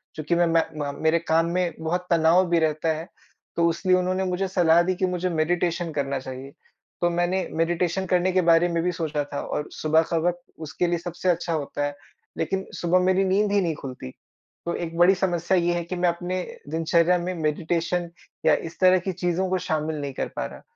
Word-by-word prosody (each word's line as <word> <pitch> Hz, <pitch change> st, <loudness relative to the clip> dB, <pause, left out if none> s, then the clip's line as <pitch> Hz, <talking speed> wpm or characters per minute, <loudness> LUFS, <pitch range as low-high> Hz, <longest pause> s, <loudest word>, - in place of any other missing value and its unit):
क्योंकि 155 Hz, +2 st, -1 dB
मैं 175 Hz, 0 st, +3 dB
मैं 165 Hz, 0 st, +3 dB, 0.3 s
म -, -, -11 dB
मेरे 160 Hz, +1 st, +3 dB
काम 165 Hz, 0 st, +2 dB
में 180 Hz, -2 st, 0 dB
बहुत 175 Hz, +3 st, -2 dB
तनाव 170 Hz, +2 st, +4 dB
भी 170 Hz, -1 st, +3 dB
रहता 155 Hz, 0 st, 0 dB
है। 165 Hz, +2 st, -7 dB, 0.5 s
तो 170 Hz, 0 st, +3 dB
इसलिए 185 Hz, +2 st, +2 dB
उन्होंने 185 Hz, +1 st, 0 dB
मुझे 185 Hz, +1 st, -1 dB
सलाह 175 Hz, -3 st, +4 dB
दी 185 Hz, +2 st, 0 dB
कि 185 Hz, -, 0 dB
मुझे 180 Hz, 0 st, -1 dB
मेडिटेशन 170 Hz, +1 st, 0 dB
करना 140 Hz, -2 st, -2 dB
चाहिए। 130 Hz, +1 st, -8 dB, 0.5 s
तो 175 Hz, -, +3 dB
मैंने 175 Hz, +2 st, 0 dB
मेडिटेशन 175 Hz, +3 st, 0 dB
करने 180 Hz, 0 st, +2 dB
के 185 Hz, 0 st, +3 dB
बारे 165 Hz, +1 st, +5 dB
में 170 Hz, -1 st, 0 dB
भी 180 Hz, -, +1 dB
सोचा 155 Hz, -4 st, -2 dB
था 145 Hz, -, -2 dB
और 150 Hz, -, -4 dB
सुबह 160 Hz, +1 st, +2 dB
का 165 Hz, -, +2 dB
वक़्त 175 Hz, 0 st, -1 dB, 0.2 s
उसके 175 Hz, +3 st, -1 dB
लिए 170 Hz, 0 st, +1 dB
सबसे 175 Hz, +2 st, -3 dB
अच्छा 170 Hz, -1 st, 0 dB
होता 145 Hz, -1 st, -2 dB
है। 145 Hz, 0 st, -4 dB, 0.4 s
लेकिन 190 Hz, 0 st, -2 dB
सुबह 175 Hz, +1 st, +3 dB
मेरी 185 Hz, +1 st, +3 dB
नींद 200 Hz, +2 st, +2 dB
ही 200 Hz, 0 st, +3 dB
नहीं 165 Hz, -4 st, -1 dB
खुलती। 130 Hz, -, -8 dB, 0.6 s
तो 170 Hz, -, -1 dB
एक 165 Hz, -1 st, -5 dB
बड़ी 175 Hz, +3 st, +6 dB
समस्या 180 Hz, 0 st, 0 dB
ये 175 Hz, 0 st, +2 dB
है 175 Hz, 0 st, -2 dB
कि 175 Hz, +2 st, -5 dB
मैं 175 Hz, 0 st, +2 dB
अपने 175 Hz, +2 st, -3 dB, 0.3 s
दिनचर्या 165 Hz, +2 st, +2 dB
में 175 Hz, +1 st, -3 dB
मेडिटेशन 170 Hz, +3 st, -1 dB, 0.4 s
या 160 Hz, -, +6 dB, 0.2 s
इस 170 Hz, -, -19 dB
तरह 185 Hz, 0 st, +6 dB
की -, -, +1 dB
चीज़ों 180 Hz, +1 st, -1 dB
को 185 Hz, -, +1 dB
शामिल 155 Hz, 0 st, -1 dB
नहीं 140 Hz, -1 st, -4 dB
कर -, -, -3 dB
पा -, -, -2 dB
रहा। -, -, -9 dB
170 Hz, 210 wpm, -24 LUFS, 160-180 Hz, 0.6 s, बड़ी